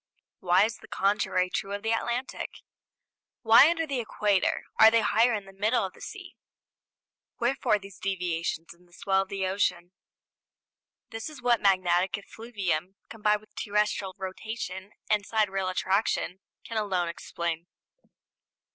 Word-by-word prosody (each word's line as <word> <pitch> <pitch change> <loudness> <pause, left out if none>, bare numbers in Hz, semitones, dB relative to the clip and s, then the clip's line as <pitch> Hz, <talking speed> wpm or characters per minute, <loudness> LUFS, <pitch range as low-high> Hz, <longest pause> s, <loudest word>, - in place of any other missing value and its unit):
Why 180 +1 +4
is 220 0 -4
the - - -15
contrary 185 -2 +1
true 195 +1 -3
of 200 - -4
the 225 - 0
Atlantic? 235 +3 -2 0.9
Why, 230 +6 +8
under 330 -1 0
the 275 -4 -2
Equator, 210 -4 +1 0.2
are 220 - +10
they 230 0 +3
highest 225 +2 +3
in 200 - -9
the 195 - -14
middle 210 +3 +1
of 190 - -7
the - - -18
sea? - - -9 1.0
Wherefore 240 -3 +2
these 195 -2 -13
deviations 170 -3 -2
in 175 +1 -25
the 175 - -25
swell 190 +2 +1
of 195 - -6
the 195 -1 -2
ocean? 185 -2 0 1.2
This 225 +5 -5
is 305 -3 -11
what 240 -1 +2
magnetic 185 -1 +3
effluvium, 195 -5 -4
combined 210 -1 +1
with 215 - -23
terrestrial 205 -2 -1
rotation 190 0 -6
and 210 -1 +2
sidereal 195 -3 0
attraction, 190 0 0 0.2
can 230 - -5
alone 185 -4 0
explain. 170 0 -4
200 Hz, 145 wpm, -28 LUFS, 185-220 Hz, 1.2 s, are